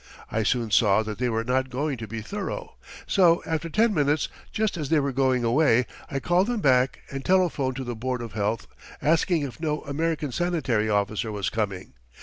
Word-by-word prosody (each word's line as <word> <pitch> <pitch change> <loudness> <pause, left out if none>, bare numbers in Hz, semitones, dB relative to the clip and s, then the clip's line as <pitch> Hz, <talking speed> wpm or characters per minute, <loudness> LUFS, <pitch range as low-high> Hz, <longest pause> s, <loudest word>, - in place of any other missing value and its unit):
I 110 - 0
soon 115 0 0
saw 110 -1 +4
that 110 0 -6
they 125 -1 +1
were 115 -1 0
not 130 +2 0
going 140 +3 -2
to 110 - -6
be 110 +1 -5
thorough, 200 - -5 0.3
so 175 -4 +4
after 160 0 -2
ten 220 +5 +3
minutes, 150 -2 +1 0.2
just 215 -1 0
as 150 -5 -4
they 160 - +4
were 140 -1 0
going 130 -2 +1
away, 125 0 +3 0.2
I 135 - -2
called 180 +7 +2
them 240 -2 -1
back 130 -5 +2
and 135 -1 -5
telephoned 170 -8 +2
to 135 - -4
the 120 -1 -4
board 125 +1 -3
of 115 -3 -8
health, 105 +2 -1 0.3
asking 165 +1 +2
if 140 0 -6
no 150 -2 -1
American 155 0 -2
sanitary 130 -10 0
officer 105 +2 0
was 100 -3 -2
coming. 100 -4 -3
130 Hz, 195 wpm, -25 LUFS, 115-160 Hz, 0.3 s, saw